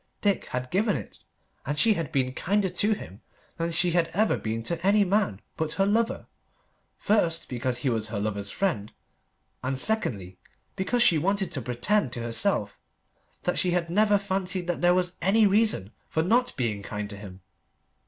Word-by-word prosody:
Dick 200 Hz, -3 st, +1 dB
had 125 Hz, +1 st, -5 dB
given 205 Hz, +3 st, +2 dB
it, -, -, -9 dB, 0.4 s
and 145 Hz, +2 st, -3 dB
she 225 Hz, +4 st, +5 dB
had 165 Hz, -5 st, -4 dB
been 130 Hz, -4 st, 0 dB
kinder 195 Hz, +6 st, 0 dB
to 210 Hz, +4 st, +1 dB
him 100 Hz, -, -9 dB, 0.4 s
than 165 Hz, 0 st, -1 dB
she 170 Hz, +1 st, +2 dB
had 170 Hz, -1 st, +2 dB
ever 215 Hz, +2 st, +3 dB
been 115 Hz, +1 st, -3 dB
to 170 Hz, +6 st, -3 dB
any 205 Hz, +2 st, +4 dB
man 195 Hz, -, +1 dB, 0.2 s
but 160 Hz, -1 st, -1 dB
her 195 Hz, -, +2 dB
lover 225 Hz, +3 st, 0 dB, 0.7 s
first, 175 Hz, -6 st, +1 dB
because 125 Hz, 0 st, -2 dB
he 125 Hz, +2 st, -1 dB
was 110 Hz, -1 st, -1 dB
her 105 Hz, -1 st, -4 dB
lover's 100 Hz, -1 st, -2 dB
friend, 155 Hz, -, -2 dB, 0.7 s
and, 130 Hz, +1 st, -2 dB
secondly, 100 Hz, -, 0 dB, 0.4 s
because 240 Hz, +6 st, +2 dB
she 165 Hz, -9 st, +5 dB
wanted 195 Hz, +2 st, 0 dB
to 145 Hz, -7 st, -4 dB
pretend 125 Hz, -, 0 dB
to 125 Hz, -, -5 dB
herself 115 Hz, -, 0 dB, 0.6 s
that 180 Hz, -, 0 dB
she 180 Hz, -, +2 dB
had 170 Hz, -1 st, -3 dB
never 210 Hz, +2 st, +4 dB
fancied 190 Hz, -2 st, -1 dB
that 175 Hz, 0 st, -2 dB
there 175 Hz, 0 st, +4 dB
was 180 Hz, -1 st, 0 dB
any 205 Hz, +5 st, +4 dB
reason 205 Hz, -, +2 dB, 0.2 s
for 160 Hz, -, 0 dB
not 245 Hz, +7 st, +1 dB
being 110 Hz, -5 st, -1 dB
kind 105 Hz, 0 st, -5 dB
to 100 Hz, -, -8 dB
him. 100 Hz, -2 st, -11 dB
170 Hz, 180 wpm, -26 LUFS, 120-200 Hz, 0.7 s, she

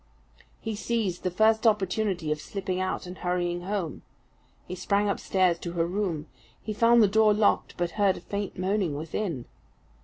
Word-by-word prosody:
He 220 Hz, -1 st, -4 dB
seized 210 Hz, -5 st, -1 dB
the 185 Hz, -, 0 dB
first 220 Hz, +5 st, +3 dB
opportunity 195 Hz, -5 st, +1 dB
of 150 Hz, 0 st, -1 dB
slipping 190 Hz, -1 st, -3 dB
out 185 Hz, 0 st, -2 dB
and 180 Hz, +1 st, -9 dB
hurrying 175 Hz, -1 st, -1 dB
home. 190 Hz, -6 st, -3 dB, 0.7 s
He -, -, -5 dB
sprang 200 Hz, +3 st, +1 dB
upstairs 185 Hz, -3 st, +1 dB
to 170 Hz, 0 st, -5 dB
her 165 Hz, -1 st, +1 dB
room. 175 Hz, -4 st, -2 dB, 0.3 s
He 215 Hz, -, -5 dB
found 230 Hz, +2 st, +5 dB
the -, -, +6 dB
door 215 Hz, +1 st, +4 dB
locked, 210 Hz, -1 st, +2 dB
but 175 Hz, -1 st, -1 dB
heard 195 Hz, -2 st, +4 dB
a -, -, -9 dB
faint 200 Hz, -1 st, -4 dB
moaning 185 Hz, -4 st, 0 dB
within. 160 Hz, -, -3 dB
190 Hz, 165 wpm, -27 LUFS, 175-210 Hz, 0.7 s, the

